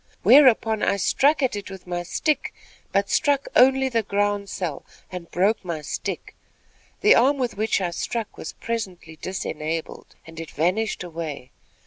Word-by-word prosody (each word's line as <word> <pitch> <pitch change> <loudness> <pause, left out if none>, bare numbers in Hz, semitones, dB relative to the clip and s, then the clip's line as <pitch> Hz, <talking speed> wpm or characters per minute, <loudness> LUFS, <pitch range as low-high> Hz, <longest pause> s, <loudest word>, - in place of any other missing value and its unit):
"Whereupon, 225 -2 +6
I - - +2
struck 285 +9 +2
at 255 - +1
it 205 -1 -6
with 190 -1 -10
my 175 -1 -3
stick, 300 - -1 0.4
but 200 +1 +1
struck 285 -1 +2
only 265 +1 +5
the 230 -3 +1
ground 205 -1 -1
sel, 170 -8 -4 0.3
and 180 -2 -7
broke 200 +5 +1
my 170 -4 -4
stick. - - -5 0.7
The 420 - +7
arm 270 +4 +4
with 250 -3 -2
which 215 +1 +1
I 180 -3 -2
struck 230 +3 -4
was - - -7
presently 185 -8 -5
disenabled, 160 -3 -5
and 165 0 -11
it 165 - -7
vanished 185 +7 -1
away. 160 -7 -6
200 Hz, 155 wpm, -24 LUFS, 170-230 Hz, 0.7 s, The